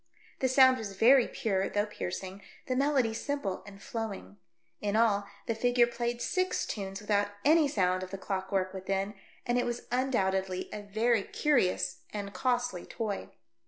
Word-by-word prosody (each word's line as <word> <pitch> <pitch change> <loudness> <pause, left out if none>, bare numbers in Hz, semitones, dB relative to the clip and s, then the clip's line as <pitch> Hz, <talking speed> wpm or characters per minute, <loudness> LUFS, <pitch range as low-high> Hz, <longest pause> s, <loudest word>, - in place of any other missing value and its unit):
The 260 - +2
sound 260 0 +6
was 205 -3 -5
very 250 +3 +6
pure 195 -3 -1
though 205 0 +1
piercing, 190 -1 -5 0.2
the 255 - -1
melody 270 -4 +2
simple 225 -6 -3
and 195 -1 -11
flowing. 200 - -5 0.4
In 205 0 -1
all, 205 -3 +3 0.2
the 230 - 0
figure 245 +1 +3
played 240 0 -3
six 370 0 0
tunes 195 -1 -5
without 205 -1 +1 0.2
any 310 0 +6
sound 185 -8 +1
of 185 - -6
the 195 - -5
clock 190 -1 -4
work 185 -1 0
within, 195 +1 -2 0.3
and 240 0 +2
it - - 0
was 240 0 -4
undoubtedly 190 -8 0
a 210 - -5
very 220 +2 +1
curious 185 -9 +1
and 200 -1 -5
costly 245 -3 0
toy. 215 -4 -4
210 Hz, 160 wpm, -30 LUFS, 195-245 Hz, 0.4 s, sound